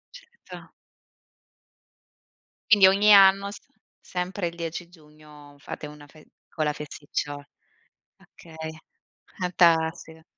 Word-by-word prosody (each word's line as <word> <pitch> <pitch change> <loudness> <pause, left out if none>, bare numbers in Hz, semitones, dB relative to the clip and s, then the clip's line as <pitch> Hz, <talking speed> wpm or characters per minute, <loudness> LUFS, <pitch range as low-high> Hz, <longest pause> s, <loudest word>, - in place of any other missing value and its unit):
Certo. 485 -1 -14 2.0
Quindi 200 -3 +7
ogni 205 +2 +5
anno, 195 0 +6
s - - -10 0.4
sempre 180 0 -4
il 170 - -8
10 170 +1 -6
giugno, 150 -3 -18
fate 150 - -8
una 150 0 -14
fe 155 +1 -19 0.2
piccola 150 -2 -2
festiccio 145 -1 -6 0.7
okay, 160 -1 -11 0.7
fantastica. 165 -2 +1
165 Hz, 95 wpm, -25 LUFS, 150-190 Hz, 2.0 s, Quindi